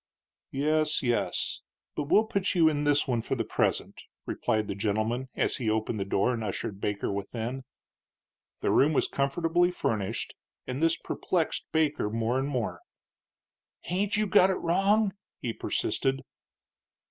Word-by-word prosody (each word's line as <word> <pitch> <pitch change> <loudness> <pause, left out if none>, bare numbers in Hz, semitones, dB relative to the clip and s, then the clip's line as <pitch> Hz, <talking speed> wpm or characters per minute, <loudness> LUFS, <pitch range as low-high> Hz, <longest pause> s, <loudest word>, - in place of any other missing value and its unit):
"Yes, 155 +2 +1
yes; 120 -2 0 0.3
but 150 - -2
we'll 210 +9 +5
put 200 -3 -1
you 165 -3 +6
in 145 -1 +1
this 145 0 +3
one 120 -3 +1
for 125 - -2
the 115 - -1
present," - - -1 0.2
replied 110 -1 -1
the - - -2
gentleman, 110 +5 -1
as - - 0
he 115 -4 -1
opened 110 0 -1
the 100 - -1
door 100 +5 +1
and 115 -2 -3
ushered 100 0 -4
Baker 105 -1 -1
within. 115 +6 -4 1.0
The - - +1
room 150 +3 +4
was - - +2
comfortably 165 +5 +1
furnished, 110 - -2 0.3
and 130 +3 -4
this 165 0 +3
perplexed 170 -4 -2
Baker 155 -8 +1
more 115 +3 0
and 135 - -1
more. 125 -6 -2 1.0
"Hain't 200 +4 -1
you 215 - +2
got 195 -2 +5
it 190 - +1
wrong?" 195 +4 +2 0.3
he 120 -4 -3
persisted. 135 +4 -1
135 Hz, 150 wpm, -28 LUFS, 115-165 Hz, 1.0 s, you